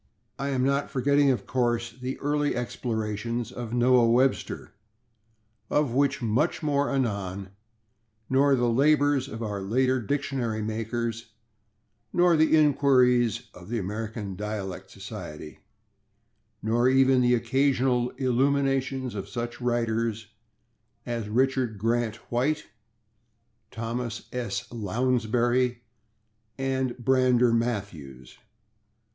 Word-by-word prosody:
I 140 +1 -2
am 130 -2 0
not 140 +1 +1
forgetting, 140 +2 +3
of 130 - 0
course, 120 -2 0
the 130 +2 -5
early 145 0 0
explorations 115 -1 -3
of 120 -3 -6
Noah 120 -1 +4
Webster, 130 +3 +1 1.0
of 145 -5 +1
which 140 0 +1
much 125 +10 0
more 145 -1 +1
anon, 100 -7 -2 0.8
nor 135 +1 +4
the 120 -1 +1
labors 145 +2 +3
of 115 -4 -6
our 105 -2 -3
later 130 +6 +1
dictionary 120 -3 -2
makers, 115 +1 -3 0.8
nor 175 -1 +4
the 160 0 +4
inquiries 125 -6 +3
of 90 +1 -13
the 120 - -1
American 105 0 -4
Dialect 105 -1 -5
Society, 75 0 -9 1.0
nor 120 +3 +2
even 130 -1 +4
the 125 0 +4
occasional 130 0 +1
illuminations 135 0 +1
of 100 -1 -6
such 120 +3 -5
writers 115 -2 -1 0.8
as 115 -3 -3
Richard 130 -1 +1
Grant 115 +1 0 0.2
White, 135 +6 0 1.0
Thomas 115 0 -4
S. 105 -6 -3
Lounsbury 120 +2 0 0.7
and 130 -2 -1
Brander 125 -1 +3
Matthews. 95 - -4
120 Hz, 105 wpm, -26 LUFS, 110-135 Hz, 1.0 s, Noah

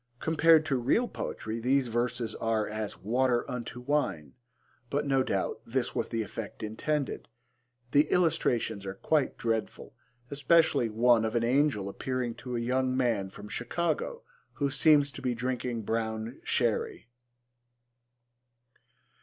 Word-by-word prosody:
Compared 160 0 +4
to 135 - +1
real 140 - +2
poetry 110 - -5
these 130 +2 +2
verses 120 0 -1
are 110 -1 0
as 110 -1 -4
'water 120 +3 +2
unto 125 -1 -5
wine,' 125 - -1 0.6
but 145 +1 -1
no 135 -1 +2
doubt 100 -2 -1
this 125 +1 -1
was - - -2
the 115 -1 -1
effect 105 - -7
intended. 135 +7 -2 0.6
The 145 +1 +4
illustrations 125 - +1
are 95 - -4
quite 150 +6 0
dreadful, 115 -2 -3 0.4
especially 140 -3 +3
one 115 +1 +4
of 110 +1 -2
an 115 - +2
angel 125 -4 +2
appearing 125 +3 -3
to 125 -2 -5
a - - -1
young 130 +2 0
man 115 -7 +1
from 105 +2 -11
Chicago 460 - -2 0.3
who 140 -1 -1
seems 145 -1 +4
to - - -9
be 125 -2 -1
drinking 125 -1 -2
brown 110 +2 -3
sherry. 460 - 0
125 Hz, 135 wpm, -29 LUFS, 115-145 Hz, 0.6 s, Compared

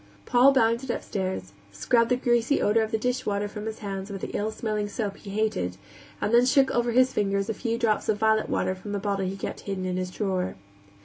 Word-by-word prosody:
Paul 250 +3 +6
bounded 235 0 +2
upstairs, 185 - -3 0.2
scrubbed 230 - +2
the 250 - +4
greasy 240 +2 +2
odor 220 +2 +3
of 220 - -1
the 220 - 0
dishwater 215 -4 -1
from 210 +1 -6
his 220 0 -4
hands 195 0 -4
with 195 -2 -6
the - - -5
ill 210 +1 0
smelling 215 -2 -2
soap 205 -2 -3
he 205 - -11
hated, 195 - -1 0.4
and 210 - -1
then 240 +1 +6
shook 270 0 +4
over 240 0 +1
his 255 +2 +4
fingers 200 0 0
a - - -2
few 230 +2 -2
drops 225 -3 0
of 215 - +2
violet 220 0 +2
water 185 - 0
from 195 +2 -7
the - - 0
bottle 195 -1 -1
he 195 +1 -4
kept - - -5
hidden 195 -2 -4
in 185 0 -2
his 185 0 -2
drawer. 185 -1 -2
215 Hz, 225 wpm, -26 LUFS, 195-235 Hz, 0.4 s, Paul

